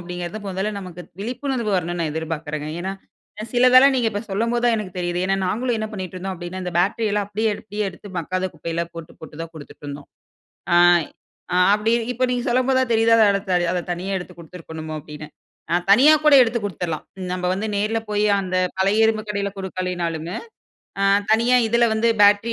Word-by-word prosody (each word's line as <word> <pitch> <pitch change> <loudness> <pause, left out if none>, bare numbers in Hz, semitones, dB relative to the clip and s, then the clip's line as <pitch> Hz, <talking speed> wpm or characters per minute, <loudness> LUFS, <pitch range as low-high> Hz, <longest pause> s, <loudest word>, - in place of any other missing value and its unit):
அப்படிங்கிறது, 175 +3 -6
முதல்ல 195 +3 -2
நமக்கு 180 -2 -9 0.2
விழிப்புணர்வு 245 0 -3
வரணும்னு 175 0 -2
நான் 155 -3 -1
எதிர்பார்க்கிறேங்க. 155 -1 -4
ஏன்னா, 190 +2 -3 0.6
சிலதெல்லாம் 255 +2 +6
நீங்க 235 -3 +2
இப்ப 205 -1 -3
சொல்லம்போது 230 +4 0
தான் 235 -1 +4
எனக்கு 190 -4 -6
தெரியுது. 175 0 -2
ஏன்னா 195 0 +1
நாங்களும் 235 +5 -1
என்ன 215 - -2
பண்ணிட்டு 185 -3 -6
இருந்தோம் 190 +1 -4
அப்படின்னா, 175 +1 -7
இந்த 180 -1 -4
பேட்டரி 205 +5 +1
எல்லாம் 205 -1 0
அப்படியே 220 +2 0
எடுத்து, 210 -1 -11
எடுத்து 190 +2 -11
மக்காத 185 +3 -2
குப்பையெல்லா 165 +2 -3
போட்டு 165 -1 -9
போட்டு 160 -1 -11
தான் 165 0 -9
கொடுத்துட்ருந்தோம். 145 -1 -10 0.7
ஆங் 175 -2 +5 0.5
ஆங் 180 +1 +4
அப்படி 215 +2 0 0.2
இப்ப 255 +2 -1
நீங்க 245 -1 -1
சொல்லம்போது 255 +2 +2
தான் 255 -2 -1
தெரிதா. 225 0 +4
அ - - +5 0.5
அத 180 - 0
தனியா 180 +3 -5
எடுத்துக் 180 -1 -11
கொடுத்திருக்கணுமோ 160 -2 -8
அப்படினு. 150 0 -10 0.5
ஆங் 175 - +1
தனியா 270 +9 +7
கூட 300 -2 +7
எடுத்து 235 -1 0
கொடுத்துடலாம். 170 -4 -4 0.3
நம்ம 180 0 -4
வந்து 210 +3 -3
நேரில 215 +2 0
போயி, 210 0 +1 0.2
அந்த 185 -1 -3 0.2
பழைய 205 +4 +3
இரும்பு 220 -1 0
கடையில 200 -1 -2
கொடுக்கலனாலுமே. 180 -2 -3 0.6
ஆ - - +1 0.3
தனியா 240 +3 +4
இதில 235 +1 +3
வந்து 230 +1 +2
பேட்டரி 205 +3 +4
195 Hz, 175 wpm, -22 LUFS, 175-225 Hz, 0.7 s, தனியா